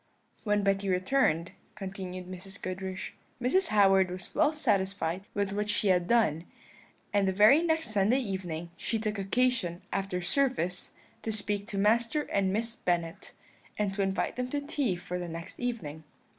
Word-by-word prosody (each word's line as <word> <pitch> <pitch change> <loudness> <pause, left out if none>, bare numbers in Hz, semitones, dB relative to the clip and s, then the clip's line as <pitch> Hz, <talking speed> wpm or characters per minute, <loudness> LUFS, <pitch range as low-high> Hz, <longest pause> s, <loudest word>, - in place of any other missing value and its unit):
"When 210 -1 +2
Betty 195 0 +1
returned," 180 - +2 0.2
continued 185 -2 -6
Mrs. 185 +2 -8
Goodriche, 190 +1 -5 0.3
"Mrs. 275 +11 +2
Howard 195 -3 +5
was 180 0 -7
well 305 0 +4
satisfied 195 - 0
with 200 -1 0
what 210 +1 -1
she 210 -1 +2
had 180 -2 +3
done; 175 -9 +2 0.7
and 200 -1 +3
the - - +3
very 215 - +6
next 320 -7 0
Sunday 210 +4 +3
evening 180 -8 -4
she 225 - -1
took 215 -1 -2
occasion, 195 -4 0
after 195 -2 -1
service, 180 -3 0 0.3
to 225 - -2
speak 205 -1 -2
to 205 - -5
Master 230 +8 +2
and 195 -1 +2
Miss 230 +3 -1
Bennet, 175 -1 -2 0.4
and 205 -2 0
to 200 - -1
invite 195 +4 -1
them 250 0 -2
to 290 - -1
tea 280 -8 0
for 180 0 -5
the 175 -1 -5
next 165 +1 -8
evening. 185 -12 -4
195 Hz, 160 wpm, -30 LUFS, 185-230 Hz, 0.7 s, very